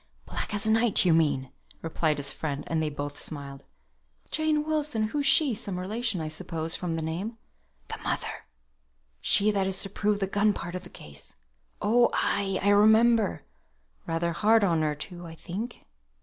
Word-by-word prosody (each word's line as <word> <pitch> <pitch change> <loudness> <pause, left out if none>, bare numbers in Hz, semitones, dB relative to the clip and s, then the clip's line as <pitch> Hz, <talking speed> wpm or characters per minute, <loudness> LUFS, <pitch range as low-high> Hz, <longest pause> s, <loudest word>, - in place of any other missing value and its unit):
"Black - - -4
as 205 +1 -1
night, 225 -2 +3
you 175 - +5
mean," 145 -5 +1 0.3
replied 160 -2 0
his 140 -1 0
friend; 145 -2 -4
and 160 -1 -1
they 155 - 0
both 145 0 -6
smiled. 140 -2 -6 0.7
"Jane 310 -1 +1
Wilson! 295 -8 -1
who's 285 +3 0
she? 290 -6 +5
some 200 -3 -4
relation, 215 +2 -1
I 160 - -3
suppose, 160 +1 -3
from 175 -3 -3
the 160 - -3
name." 185 +9 -4 0.5
"The - - -6
mother, - - -4 0.7
she 210 +1 +4
that 195 -2 0
is 190 0 0
to 195 - -5
prove 210 0 0
the 195 - +1
gun 205 +2 +2
part 175 -2 -6
of 185 0 -5
the 180 - -10
case." 70 - -11 0.5
"Oh, 240 +3 +4
ay 200 -1 0
I 200 - +3
remember! 220 +3 +4 0.6
Rather 165 +1 0
hard 215 +5 +4
on 170 -5 +2
her, 150 -1 0
too, 175 +3 -7
I 165 - -10
think." 200 +9 -6
190 Hz, 175 wpm, -27 LUFS, 160-220 Hz, 0.7 s, you